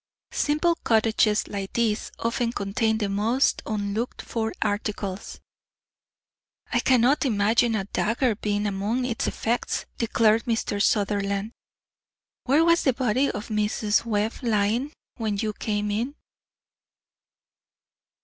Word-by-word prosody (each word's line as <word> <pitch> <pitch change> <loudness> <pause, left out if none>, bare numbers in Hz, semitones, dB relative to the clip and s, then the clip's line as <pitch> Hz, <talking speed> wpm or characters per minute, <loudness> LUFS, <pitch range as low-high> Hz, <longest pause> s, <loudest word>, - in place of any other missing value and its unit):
Simple 330 +3 +1
cottages 220 -1 +2
like 195 -2 -5
these 225 -3 0
often 230 0 -1
contain 220 +2 0
the 210 -2 -1
most 220 +7 +1
unlooked 215 +2 -3
for 225 -1 -2
articles." 205 -1 -3 1.3
"I - - +3
cannot 255 +2 +3
imagine 225 -1 +2
a 205 - -1
dagger 230 +5 0
being 205 0 -1
among 210 +5 -1
its 235 -3 -2
effects," 235 +2 -1
declared 225 -1 +3
Mr. 225 -3 -1
Sutherland. 200 0 +1 0.9
"Where 290 +5 +4
was 335 0 +4
the 265 - +2
body 255 +2 +1
of 210 +3 -5
Mrs. 210 0 +1
Webb 220 -1 0
lying 230 +4 +1 0.3
when 215 -4 -1
you 215 0 -1
came 210 -1 -2
in?" 240 +8 -2
220 Hz, 115 wpm, -25 LUFS, 205-240 Hz, 1.3 s, Where